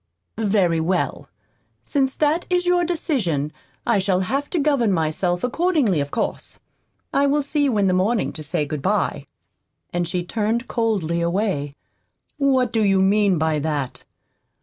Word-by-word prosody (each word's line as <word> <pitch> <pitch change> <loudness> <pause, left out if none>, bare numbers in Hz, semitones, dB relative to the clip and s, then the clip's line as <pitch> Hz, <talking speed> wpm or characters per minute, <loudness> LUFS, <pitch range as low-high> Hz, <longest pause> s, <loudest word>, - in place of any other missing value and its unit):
"Very 195 -6 +2
well. 175 +3 -1 0.5
Since 270 -2 0
that 310 +3 +1
is 360 0 +1
your 355 0 +3
decision 225 - -1 0.3
I 230 -4 +3
shall 190 -1 +1
have 275 +9 -2
to 355 - -2
govern 280 -8 +2
myself 175 +1 0
accordingly, 280 - +1
of 140 0 -2
course. - - -3 0.5
I 280 +1 +3
will 290 +1 +2
see 290 +1 0
you 250 -6 +1
in 200 - +3
the 185 - +2
morning 200 +5 +1
to 155 - -7
say 150 0 -1
good 150 -1 -4
bye." - - 0 0.7
And 175 -1 0
she 180 0 -2
turned 225 +5 -1
coldly 195 -8 0
away. 170 -5 -1 0.6
"What 260 -4 +2
do 225 -2 +2
you 195 -2 +3
mean 195 -1 +3
by 155 -1 +1
that?" 145 -3 -3
205 Hz, 155 wpm, -22 LUFS, 170-275 Hz, 0.7 s, your